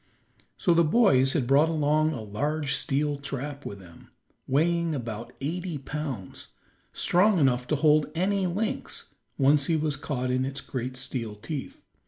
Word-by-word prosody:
So 175 - +3
the 170 0 +5
boys 145 - +4
had 140 -6 +1
brought 140 +5 +4
along 155 0 +2
a 125 -8 -5
large 145 +7 -1
steel 145 0 0
trap 140 +1 -5
with 100 - -7
them, 90 -4 -15 0.4
weighing 165 +3 +1
about 115 -3 -5
eighty 170 +3 -3
pounds, 140 -8 -6 0.4
strong 190 +3 +3
enough 125 -5 +2
to 155 - +1
hold 150 +1 +4
any 190 +2 +1
lynx 205 +5 -3 0.2
once 140 0 +4
he 165 - +2
was 155 -2 0
caught 130 -4 -3
in 130 0 +1
its 135 +1 -3
great 130 0 -5
steel 125 -5 -4
teeth. 135 +7 -7
145 Hz, 155 wpm, -27 LUFS, 130-160 Hz, 0.4 s, the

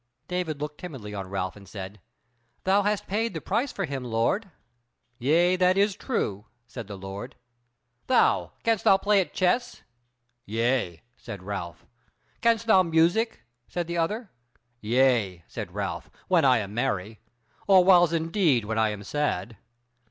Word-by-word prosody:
David 180 -5 -2
looked 150 0 -5
timidly 130 -12 -8
on 95 -2 -5
Ralph 95 -2 -3
and 100 -2 -14
said: 95 0 -8 0.6
"Thou 195 +2 +3
hast 205 0 0
paid 215 0 -1
the - - -2
price 230 - -1
for 195 - -3
him, 135 -3 -4
lord." 120 - 0 0.7
"Yea, 170 +8 +3
that 185 +1 +3
is 200 0 +3
true," 105 - -2 0.2
said 120 -3 -8
the 100 -2 -7
Lord. 95 +7 -7 0.7
"Thou! 260 - +3
can'st 225 -3 +1
thou 195 - +6
play 205 0 +3
at 175 - -4
the - - -26
chess?" 240 +7 0 0.6
"Yea," 115 -5 0
said 100 -3 -9
Ralph. 95 -4 -6 0.6
"Can'st 230 -1 +2
thou 205 -4 +6
music?" 175 +7 +2 0.2
said 175 -1 -3
the 170 0 -3
other. 210 +6 -2 0.5
"Yea," 115 -7 +2
said - - -6
Ralph, - - -4 0.2
"when 170 -5 +3
I 130 -2 +5
am 100 -2 -4
merry, 105 -2 -2 0.5
or 190 -2 +7
whiles 175 -3 +6
indeed 165 - +1
when 110 +1 -1
I 110 -1 +3
am 105 -1 -6
sad." 115 -5 -2
150 Hz, 155 wpm, -26 LUFS, -, 0.7 s, or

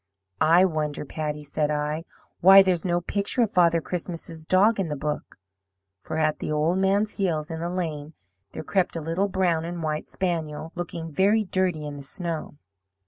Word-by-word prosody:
"'I 170 +4 +5
wonder, 155 -4 -2
Patty,' 150 0 -4
said 150 +1 -1
I, 150 +2 -2 0.3
'why 195 +2 +9
there's 180 -3 +1
no 175 -1 0
picture 200 +7 0
of 215 - -1
Father 170 -2 +4
Christmas's 165 -2 -6
dog 205 +4 +4
in 190 - 0
the 150 - -3
book.' 150 +1 -4 0.6
For - - -5
at 155 -1 +1
the - - -3
old 155 +5 +1
man's 200 +2 +2
heels 165 -5 -2
in 160 - -4
the 170 +1 -3
lane 160 -4 -4 0.4
there - - -6
crept 190 -3 0
a - - -2
little 165 +5 -1
brown 180 -4 +1
and 170 0 -5
white 155 -1 -3
spaniel 160 -3 -3
looking 170 -2 -5
very 200 +7 +3
dirty 185 -5 -1
in 145 -1 -6
the - - -8
snow. 165 0 -5
165 Hz, 180 wpm, -25 LUFS, 155-185 Hz, 0.6 s, why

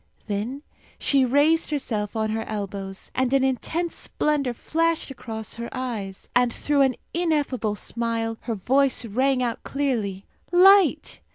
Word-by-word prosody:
Then 220 +8 -3 0.3
she 275 -2 +3
raised 290 +6 +3
herself 225 -8 -2
on 220 -1 0
her 225 +1 -1
elbows, 195 -2 -5
and 260 -1 0
an 270 - +3
intense 320 +6 -1
splendour 280 -5 -1
flashed 330 +2 0
across 225 -4 -6
her 235 0 -6
eyes, 225 -7 -5
and 245 -1 +4
through 290 +4 +1
an 265 -2 +3 0.2
ineffable 290 -10 0
smile 230 0 -2
her 230 -1 -3
voice 260 +5 +2
rang 255 +4 +1
out 235 -2 -2
clearly. 225 -9 -2 0.3
"Light!" 380 0 +5
250 Hz, 135 wpm, -24 LUFS, 220-285 Hz, 0.3 s, Light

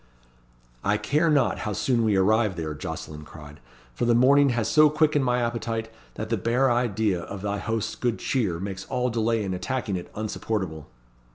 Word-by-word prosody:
"I 100 +1 +2
care 155 +8 +1
not 140 -6 +2
how 105 - -3
soon 120 +3 +1
we 110 -2 +2
arrive 105 +1 +3
there," 80 -2 -4
Jocelyn 75 +1 -7
cried; 75 -1 -12 0.3
"for - - -1
the 120 0 +4
morning 140 +3 +5
has 120 -3 0
so 155 0 +6
quickened 150 -1 +2
my 125 -1 +1
appetite, 115 -1 -3 0.2
that 110 - -5
the 115 - +1
bare 120 +6 +2
idea 110 -6 +1
of 95 +2 -8
thy 100 0 -2
host's 115 0 -2
good 120 -2 -1
cheer 100 -11 -1
makes 95 0 -5
all 125 0 -1
delay 115 -1 0
in 95 -2 -2
attacking 110 0 -2
it 90 - -8
unsupportable." 100 -7 -3
110 Hz, 180 wpm, -25 LUFS, 95-125 Hz, 0.3 s, so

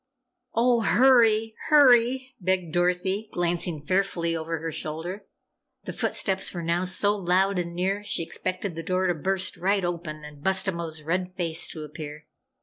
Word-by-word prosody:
"Oh, 235 0 +3
hurry! 225 -1 +4 0.2
Hurry!" 260 -2 +5
begged 185 -3 -1
Dorothy, 180 +4 0
glancing 175 -2 -1
fearfully 170 0 0
over 165 0 -3
her 165 +1 -4
shoulder. 170 +7 -6 0.6
The - - -6
footsteps 190 -1 -1
were 170 - -4
now 170 +2 0
so 205 +3 +1
loud 190 0 +2
and 170 -1 -4
near, 195 +3 -1
she 205 -4 -1
expected 185 +2 -4
the 165 - -5
door 185 +3 0
to 180 - +2
burst 185 +4 -2
right 195 +1 +1
open 165 -3 -5
and 150 -1 -12
Bustabo's 170 -4 0
red 180 +3 -2
face 170 -3 0
to 155 - -7
appear. 150 0 -8
180 Hz, 150 wpm, -26 LUFS, 165-195 Hz, 0.6 s, Hurry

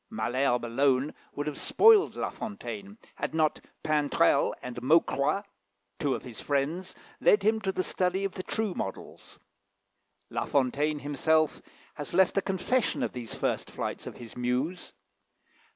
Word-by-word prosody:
Malherbe 120 +3 0
alone 130 +3 +2 0.2
would 145 - -2
have 150 -2 -4
spoiled 435 -2 +5
La - - -2
Fontaine, 205 -1 -7 0.2
had - - -3
not 155 -1 +1 0.2
Pintrel 150 -2 +2
and 120 -1 -6
Maucroix, 150 +4 +3 0.6
two 140 -3 +1
of - - -7
his 120 -4 -9
friends, 150 +6 -1 0.2
led - - +4
him 220 0 +2
to 195 -1 0
the 185 - -1
study 185 +1 0
of 195 - -1
the 185 - -4
true 215 +1 -1
models. 95 - -7 0.9
La - - -1
Fontaine 145 +3 +1
himself 150 +2 +1 0.3
has 145 +3 -6
left 190 0 +4
a 195 - +3
confession 200 +6 0
of - - -2
these 120 -3 -6
first - - -1
flights - - -5
of - - -8
his 115 -2 -11
muse. 125 +9 -2
150 Hz, 150 wpm, -29 LUFS, 130-190 Hz, 0.9 s, spoiled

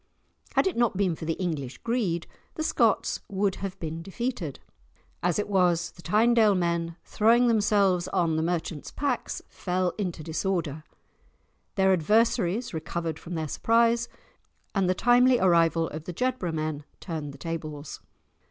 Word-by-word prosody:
Had - - +4
it 380 - 0
not 235 -5 +1
been 190 -4 +1
for 160 - -7
the 165 - 0
English 150 -8 -3
greed, 210 -9 -1 0.3
the 315 - -2
Scots - - +2
would 195 0 0
have 195 0 -5
been 165 0 -4
defeated. 195 - -4 0.6
As 175 -1 +1
it 210 - -1
was, 180 -4 +2
the - - -15
Tynedale 215 +3 +4
men, 170 -1 -1
throwing 235 +3 +4
themselves 200 -5 +3
on 170 -4 +1
the 160 - +1
merchants' 165 -2 -2
packs, 285 -1 -2
fell 180 -1 -1
into 175 -5 -3
disorder, 160 -2 -2 0.9
their 190 -1 +4
adversaries 220 +4 +2
recovered 160 0 -3
from 170 +1 -7
their 160 -1 -2
surprise, 230 +6 +2 0.6
and 195 -3 +1
the 185 - +2
timely 245 +4 +5
arrival 165 -3 +3
of 155 +1 -7
the 180 - -5
Jedburgh 250 -6 -1
men 155 -1 -3 0.2
turned 155 -5 -5
the 140 - -12
tables. 155 -2 -6
180 Hz, 150 wpm, -27 LUFS, 165-215 Hz, 0.9 s, timely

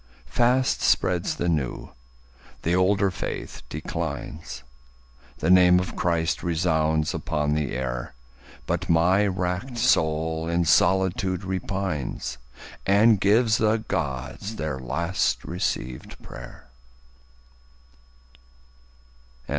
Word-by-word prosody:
Fast 125 - +2
spreads 90 -1 +1
the 85 - -2
new; 75 -7 -2 0.7
the 85 - +1
older 95 +1 +3
faith - - -5
declines. 65 -5 -5 0.7
The 80 - +1
name 90 -1 +7
of 90 - -4
Christ 85 -2 0
resounds 80 -2 +1
upon 75 0 -1
the 75 -5 -1
air. 60 -1 -4 0.5
But - - -2
my 90 +5 +4
wrack'd 95 +6 -2
soul 80 -8 +1
in 85 0 +1
solitude 95 +1 +2
repines 95 -5 -3 0.5
And 105 +2 +4
gives 110 +3 +3
the 110 0 +3
Gods 70 - -4
their 75 -8 -3
last 80 +8 -1
receivèd 65 -7 -4
pray'r. - - -11
85 Hz, 95 wpm, -25 LUFS, 75-95 Hz, 0.7 s, name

